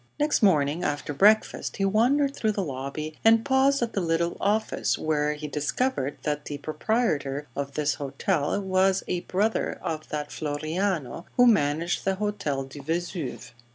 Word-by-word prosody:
Next 295 -2 +2
morning 160 -4 +3
after 145 -1 -2
breakfast 210 +9 +3
he 195 - +1
wandered 265 +8 +2
through 215 -1 0
the 200 - -1
lobby 140 +2 -5
and 225 0 +5
paused 270 0 +3
at 235 - -3
the 200 - 0
little 170 0 0
office, 215 +2 +1
where 150 -1 0
he 150 0 -6
discovered 150 - -1
that 150 0 -2
the 145 - -5
proprietor 150 - -1
of 140 -1 -4
this 150 -1 +1
hotel 140 +4 -1
was 190 0 +2
a 180 - -1
brother 205 +5 -1
of 160 -3 -4
that 150 -1 -3
Floriano 160 +1 -2
who 245 - +7
managed 165 -5 +2
the 195 - +1
Hotel 195 -9 -2
du 135 +2 -10
Vesuve. 165 -4 -4
165 Hz, 155 wpm, -26 LUFS, 145-210 Hz, -, who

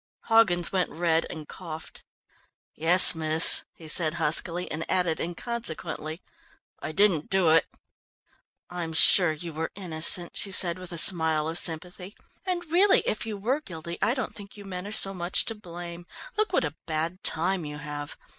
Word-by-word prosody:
Hoggins 195 -7 0
went 185 -2 -3
red 165 -1 -3
and 155 -2 -11
coughed. 160 -3 -13 0.7
"Yes, 175 +4 +8
miss," 160 0 +6
he 160 - -15
said 155 0 0
huskily 170 +2 +1
and 155 +2 -6
added 180 -3 -2
inconsequently, 170 -4 -6 0.6
"I - - -7
didn't 170 -3 -1
do 190 -4 0
it!" 165 - +1 1.0
"I'm 175 -2 -8
sure 175 +1 +6
you 160 +2 -10
were 160 +1 -7
innocent," 175 -1 +2
she 200 - -2
said 180 -2 +3
with 185 -1 -12
a 170 - -9
smile 160 -3 +3
of 165 +2 +1
sympathy, 180 +4 -3 0.3
"and 350 -1 -5
really 380 +4 +1
if 215 - -6
you 215 -2 -8
were 250 +9 -4
guilty 170 - -11
I 240 - -1
don't 260 - -7
think 205 0 -13
you 205 - -14
men 185 0 -9
are - - -10
so 195 -2 +3
much 180 +1 +1
to 225 - -4
blame. 175 -3 -13 0.3
Look 430 0 -3
what - - -2
a 150 0 -9
bad 165 +3 -6
time 180 +2 -1
you 150 -1 -10
have! 145 -1 -10
175 Hz, 170 wpm, -23 LUFS, 160-195 Hz, 1.0 s, Yes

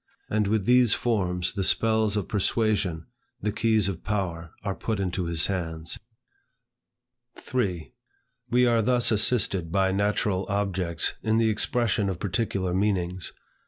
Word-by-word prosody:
And 105 -1 +1
with 105 -1 0
these 125 -2 +5
forms, 90 -7 -1
the 100 -1 -2
spells 110 +1 +2
of 100 - -2
persuasion, 100 -5 0 0.3
the 105 - -1
keys 110 -2 +2
of 95 -4 -4
power 90 -5 -3
are 100 -2 -2
put 110 +1 -3
into 90 -1 -2
his 85 0 +2
hands. 80 -3 -3 1.4
3. 95 -10 -3 0.6
We 125 +2 +4
are 115 -1 +3
thus 120 +1 +3
assisted 100 -6 +2
by 95 0 +2
natural 100 -1 0
objects 95 -4 -1
in 110 0 +1
the 115 -1 +3
expression 110 -2 0
of 95 - -3
particular 95 -2 -2
meanings. 95 -2 -1
100 Hz, 135 wpm, -26 LUFS, 90-110 Hz, 1.4 s, these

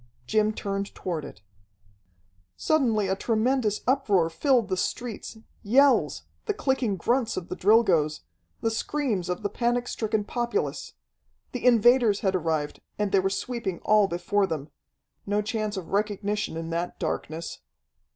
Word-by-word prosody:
Jim 215 - +2
turned 200 -1 -4
toward 170 -5 -3
it. 105 - -11 1.1
Suddenly 235 -10 +2
a 190 - +1
tremendous 225 +1 +1
uproar 200 -10 +2
filled 250 - +2
the 190 - 0
streets, 230 +4 -4 0.2
yells, 220 - +3 0.2
the - - 0
clicking 260 -7 0
grunts 235 +6 0
of 180 - -5
the - - -3
Drilgoes, 185 -8 +3 0.4
the 225 - +1
screams 225 -6 -1
of 180 +4 -3
the 205 - 0
panic 240 +2 0
stricken 220 -1 -1
populace. 240 - -2 0.6
The 250 - -5
invaders 235 -2 +5
had 190 -1 +1
arrived, 160 -4 -1 0.2
and 210 -2 -1
they 195 - +4
were 190 +1 +1
sweeping 195 -2 -3
all 210 -2 +5
before 195 +3 0
them. 155 -3 -5 0.6
No 205 +1 +1
chance 215 -2 -2
of 175 -4 -6
recognition 205 -2 -1
in 165 0 -5
that 170 +1 -3
darkness. 160 +2 -4
210 Hz, 140 wpm, -26 LUFS, 185-235 Hz, 1.1 s, invaders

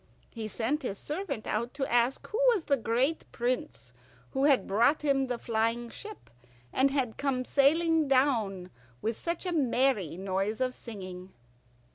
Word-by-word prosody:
He 225 -2 -5
sent 245 +8 -1
his 205 -7 -3
servant 300 - -4
out 235 +5 -2
to 275 -1 -1
ask 240 +2 +1
who 435 - -4 0.2
was 370 - -3
the 280 - +3
great 255 +6 0
prince 125 - -3 0.4
who 270 +1 +1
had 275 -8 +4
brought 235 +10 +3
him 275 -2 +2
the 245 -1 -2
flying 230 +1 -1
ship, 425 - -10 0.4
and 270 +1 +4
had 265 -5 -1
come 260 -3 -1
sailing 320 +3 +3
down 225 -9 +1 0.3
with 225 +1 0
such 340 - -3
a 360 - -1
merry 255 - +1
noise 195 +3 -1
of 255 -1 0
singing. 185 -6 -9
250 Hz, 155 wpm, -29 LUFS, 220-280 Hz, 0.4 s, had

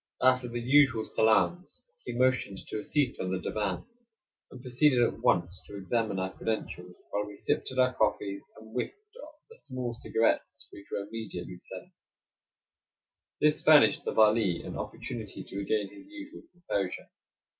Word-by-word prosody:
After 130 -1 +4
the 120 0 -4
usual 130 -2 +4
salaams, 110 - +1 0.2
he - - -4
motioned 130 -5 +1
to 110 - -5
a - - -4
seat 140 +1 0
on 95 - -2
the 95 - 0
divan, 100 -3 -2 0.6
and 125 - -11
proceeded 125 +2 +3
at 120 - +2
once 90 +1 +1
to 100 - -8
examine 105 +1 -1
our 95 0 -2
credentials 90 -5 -4 0.2
while 105 0 -1
we 105 - -9
sipped - - -1
at 130 - -7
our 130 0 +4
coffee, 100 -3 0 0.2
and 110 0 -14
whiffed 125 - -2 0.2
the 310 0 -14
small 130 - -5
cigarettes 115 -1 0
which 100 - -12
were 100 - -2
immediately 95 -5 -6
served. - - -10 1.5
This 150 0 +3
furnished 155 -2 +6
the - - -2
Vali 110 -5 +4
an - - -6
opportunity - - -6
to 95 - -9
regain 100 0 0
his 295 - -13
usual 300 +1 -10
composure. 100 - -3
115 Hz, 155 wpm, -29 LUFS, 100-130 Hz, 1.5 s, furnished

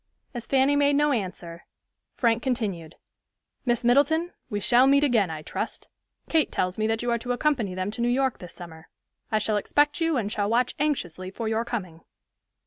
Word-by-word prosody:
As 240 -2 -6
Fanny 270 +1 +3
made 285 0 +3
no 295 +1 +3
answer, 180 -7 -4 0.5
Frank 235 -2 +2
continued, 200 - -3 0.7
"Miss 240 0 +1
Middleton, 310 +7 +3 0.2
we 205 -3 -2
shall 240 +5 +5
meet 280 +1 +4
again, 230 - +3
I 155 -1 -6
trust. - - -5 0.4
Kate 320 -2 +2
tells 180 0 -1
me 215 - +1
that 225 +1 -1
you 240 - 0
are 235 - +1
to 245 +2 -2
accompany 245 -8 0
them 185 +2 -2
to 235 - -5
New 240 - +2
York 265 0 +1
this 175 -2 -9
summer. 160 -2 -11 0.4
I 215 - +3
shall 215 0 0
expect 290 - +1
you 325 -3 +2
and 210 -3 -2
shall 205 -1 -1
watch 240 +2 +1
anxiously 185 - -2
for 220 +4 -5
your 220 +1 0
coming." 185 -9 -5
235 Hz, 190 wpm, -26 LUFS, 195-270 Hz, 0.7 s, shall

